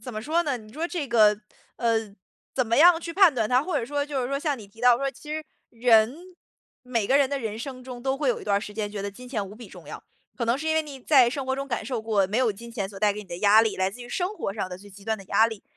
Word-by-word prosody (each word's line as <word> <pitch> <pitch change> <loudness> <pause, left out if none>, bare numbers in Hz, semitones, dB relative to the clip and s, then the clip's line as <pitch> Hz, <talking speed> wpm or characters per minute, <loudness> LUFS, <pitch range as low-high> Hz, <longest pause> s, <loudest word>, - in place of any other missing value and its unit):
怎 250 +1 -7
么 215 0 -5
说 330 +6 +1
呢， 285 -5 -1
你 215 -1 -13
说 325 +3 -3
这 335 -6 -3
个， 215 -3 +4 0.4
呃， 230 -1 +2 0.6
怎 255 -3 +1
么 230 +4 +2
样 340 +1 +7
去 335 0 -6
判 370 -6 +6
断 225 -3 +1
它？ 250 +4 +3
或 365 +3 -1
者 230 - -3
说 285 +2 -2
就 275 -3 -2
是 - - -1
说 275 - -1
像 290 -2 -1
你 210 - -11
提 225 +3 -18
到 245 -1 +6
说， 275 +2 -1
其 300 +4 -12
实 310 0 -3 0.2
人 230 0 +4 0.7
每 235 -5 -1
个 275 +2 +4
人 275 -2 +3
的 280 - -2
人 220 -4 -4
生 255 0 -7
中， 250 -2 -8
都 270 +1 0
会 275 -3 +1
有 - - -2
一 - - -10
段 200 -1 +2
儿 - - +1
时 210 - -7
间 210 -1 -3
觉 205 -1 -5
得 200 - -3
金 250 +5 -12
钱 215 -6 -3
无 200 - -11
比 235 +1 -11
重 - - -13
要。 - - -8 0.3
可 235 - -2
能 235 +3 +2
是 315 +3 -5
因 315 - +2
为 320 - +3
你 285 -3 -9
在 260 -2 +5
生 275 +2 -3
活 265 0 -1
中 275 +1 -5
感 235 -3 -2
受 245 -1 -3
过， 215 -3 +1
没 210 +5 -1
有 255 -3 +3
金 230 +3 -9
钱 200 -5 -3
所 195 -1 -10
带 210 0 +3
给 210 - -6
你 210 - -12
的 175 - -6
压 210 +3 +6
力， 225 -2 0
来 190 0 +1
自 245 - -12
于 240 - -9
生 370 +9 -2
活 195 - -4
上 195 -3 -3
的 180 - -7
最 205 - -14
极 200 0 -15
端 220 -1 -1
的 195 - -11
压 210 +4 +4
力。 220 -3 -7
240 Hz, 345 characters per minute, -25 LUFS, 215-275 Hz, 0.7 s, 样